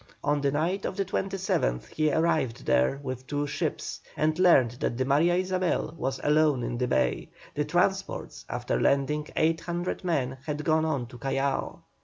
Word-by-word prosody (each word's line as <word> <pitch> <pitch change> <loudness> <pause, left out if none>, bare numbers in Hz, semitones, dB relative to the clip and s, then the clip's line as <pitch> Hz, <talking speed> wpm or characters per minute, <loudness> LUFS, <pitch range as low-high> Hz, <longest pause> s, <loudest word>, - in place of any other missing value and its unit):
On 145 0 +1
the 140 - +2
night 170 +7 0
of 185 - -3
the 195 - 0
27th 185 - -1
he 155 -1 +1
arrived 155 -6 +1
there 65 - +2
with 130 -1 -5
two 145 0 -1
ships, 140 - -3 0.2
and 155 +2 +1
learned 155 -10 +5
that 120 - -1
the 130 - 0
Maria 155 +6 +3
Isabel 185 -4 0
was 130 -3 -2
alone 150 -4 +3
in 120 0 -3
the 125 - +1
bay; - - 0 0.2
the - - -1
transports, - - -1
after - - -1
landing 150 +2 +1
800 170 +3 -1
men, 135 -7 -1
had 150 0 -2
gone 160 -1 +3
on 140 -6 -1
to 120 0 -12
Callao. 135 +2 -1
150 Hz, 170 wpm, -27 LUFS, 130-165 Hz, 0.2 s, learned